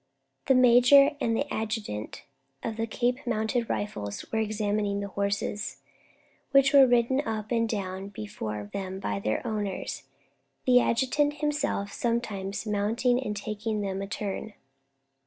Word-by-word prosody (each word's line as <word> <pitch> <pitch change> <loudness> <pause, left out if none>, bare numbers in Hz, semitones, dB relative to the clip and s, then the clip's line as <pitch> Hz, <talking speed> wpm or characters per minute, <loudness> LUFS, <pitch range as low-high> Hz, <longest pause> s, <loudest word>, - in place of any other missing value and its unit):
The 265 - +5
major 255 +3 +7
and 230 +2 +1
adjutant 215 - -4 0.4
of 225 - -3
the 225 0 -1
Cape 245 +2 0
Mounted 230 +1 0
Rifles 105 - -3
were 220 - 0
examining 210 -1 0
the 200 0 -4
horses, 200 +1 -2 0.7
which 275 0 +5
were 275 -2 +8
ridden 245 +2 +3
up 215 -2 -4
and 230 -1 +1
down 195 -2 -3
before 105 - -6
them 190 -1 -4
by 100 - -2
their 110 - -2
owners, 210 -4 -3 0.6
the 250 -2 +6
adjutant 270 +5 +2
himself 295 -9 -1
sometimes 215 -4 -2
mounting 225 +4 +1
and 210 -3 -3
taking 215 +1 -3
them 195 -1 -3
a 195 - -4
turn. 205 +1 -4
215 Hz, 135 wpm, -28 LUFS, 200-245 Hz, 0.7 s, were